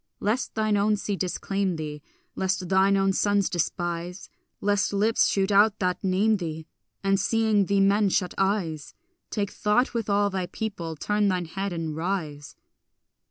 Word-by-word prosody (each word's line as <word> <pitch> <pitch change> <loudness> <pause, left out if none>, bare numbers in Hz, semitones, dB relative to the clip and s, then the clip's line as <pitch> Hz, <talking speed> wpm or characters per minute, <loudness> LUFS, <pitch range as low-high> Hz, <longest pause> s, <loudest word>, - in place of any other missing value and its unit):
Lest 225 +5 -1
thine 215 -1 +1
own 210 +1 +2
sea 205 0 -3
disclaim 190 0 -2
thee, 150 -2 -6 0.3
Lest 190 -1 -1
thine 195 +1 +4
own 195 0 +2
sons 205 0 +1
despise, 175 +1 -3 0.3
Lest 205 -1 +1
lips 210 +3 +2
shoot 195 0 +1
out 205 +1 +5
that 180 0 -1
name 200 +3 +2
thee 160 -3 -5 0.4
And 195 0 +2
seeing 220 -3 +2
thee 200 -1 +2
men 200 +1 +3
shut 180 -1 0
eyes, 190 -6 -1 0.3
Take 205 -2 -2
thought 215 +5 +1
with 230 -3 -2
all 205 0 +2
thy 185 -2 -2
people, 180 -5 -5
turn 210 +6 0
thine 180 -2 0
head 195 +4 -4
and 165 -3 -4
rise. 160 -4 -4
195 Hz, 160 wpm, -26 LUFS, 180-205 Hz, 0.4 s, out